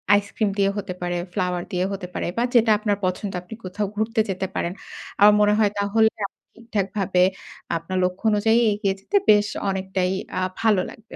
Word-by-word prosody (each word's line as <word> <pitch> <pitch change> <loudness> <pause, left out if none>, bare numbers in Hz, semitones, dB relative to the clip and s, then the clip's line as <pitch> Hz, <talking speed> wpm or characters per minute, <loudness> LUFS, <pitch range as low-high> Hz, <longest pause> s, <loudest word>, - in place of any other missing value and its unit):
Ice cream 205 +1 0
দিয়ে 195 0 +3
হতে 200 -2 -4
পারে, 175 0 -1 0.2
ফ্লাওয়ার 180 -3 -1
দিয়ে 180 -1 0
হতে 190 -2 -5
পারে - - -3
বা 235 - +2
যেটা 225 -2 +5
আপনার 210 -1 0
পছন্দ 185 +2 -2
আপনি 180 +5 -11
কোথাও 200 +3 -3
ঘুরতে 220 +2 -1
যেতে 190 0 -2
পারেন। 170 - -1 0.5
আমার 210 +1 +8
মনে 210 0 +4
হয় 210 -2 +3
তাহলে 220 +2 +3 0.2
আপনি - - -67
ঠিকঠাকভাবে 200 -5 0 0.5
আপনার 165 +3 -4
লক্ষ্য 180 +3 -2
অনুযায়ী 220 +2 +3
এগিয়ে 205 -2 0
যেতে 405 - 0
বেশ 210 -1 +6 0.2
অনেকটাই 190 -1 -1 0.3
আ - - -1 0.2
ভালো 215 -4 +3
লাগবে। 225 0 -13
200 Hz, 180 wpm, -23 LUFS, 185-215 Hz, 0.5 s, আমার